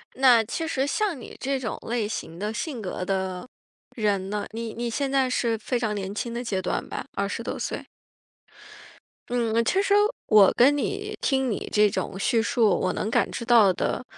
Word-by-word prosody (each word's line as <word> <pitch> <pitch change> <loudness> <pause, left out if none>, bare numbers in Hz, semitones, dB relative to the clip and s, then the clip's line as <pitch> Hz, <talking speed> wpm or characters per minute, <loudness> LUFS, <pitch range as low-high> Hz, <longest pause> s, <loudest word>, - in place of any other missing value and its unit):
那 250 -4 +6
其 320 +9 -4
实 270 -3 0
像 370 0 -1
你 - - -10
这 270 0 -1
种 230 -4 -4
类 230 -3 -1
型 170 -5 -6
的 210 +3 -3
性 235 +1 -4
格 185 -1 -4
的 190 +2 -2 0.5
人 200 -4 0
呢 210 0 -2
你 225 0 -5
你 240 +1 -3
现 275 +3 -2
在 270 -2 +3
是 230 -3 0
非 240 +3 -2
常 215 -3 -1
年 195 0 -4
轻 235 +2 -3
的 240 +1 -3
阶 195 -5 -2
段 180 - -2
吧， - - -5
20 200 +3 -2
多 - - -4
岁？ - - -4 1.5
嗯， 230 -1 +1
其 380 - +2
实 400 0 +1 0.3
我 210 -3 +7
跟 270 +4 +6
你 410 +7 -3
听 265 -2 +1
你 210 - -3
这 210 -1 +4
种 190 - -4
叙 230 +2 +2
述， 225 -1 +2
我 185 - 0
能 210 - -2
感 - - +2
知 235 - -5
到 225 -5 +6
的， 180 - -2
230 Hz, 205 characters per minute, -25 LUFS, 205-260 Hz, 1.5 s, 我